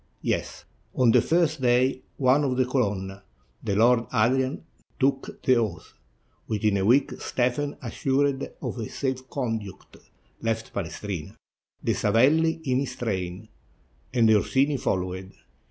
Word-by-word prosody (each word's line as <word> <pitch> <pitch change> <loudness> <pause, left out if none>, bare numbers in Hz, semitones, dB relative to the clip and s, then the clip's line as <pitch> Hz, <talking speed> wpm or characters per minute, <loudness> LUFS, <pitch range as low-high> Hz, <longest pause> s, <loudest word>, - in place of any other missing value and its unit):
"Yes. - - -2 0.3
On 125 -3 +4
the - - +5
first 160 -3 +1
day, 125 +1 +2 0.2
one 135 +2 +3
of 130 -3 0
the 130 - +3
Colonna, 100 -7 -2 0.4
the 100 -3 -1
Lord 115 +2 +4
Adrian, 130 +5 +1 0.4
took 135 0 -1
the 130 -1 +4
oath; 105 -8 -3 0.5
within 105 -1 +1
a 95 - 0
week, 130 +6 +4
Stephen, 130 +4 -1
assured 135 +3 0
of 120 - -4
safe 130 -1 -3
conduct, 115 -8 -5 0.4
left 115 0 -2
Palestrina, 90 -2 -5 0.5
the - - +1
SaveUi 155 +10 +3
in 130 -1 +1
his 130 -2 -3
train; 95 -3 -3 0.6
the 115 -3 +4
Orsini 135 +7 +2
followed. 95 -3 -2
125 Hz, 125 wpm, -26 LUFS, 105-135 Hz, 0.6 s, the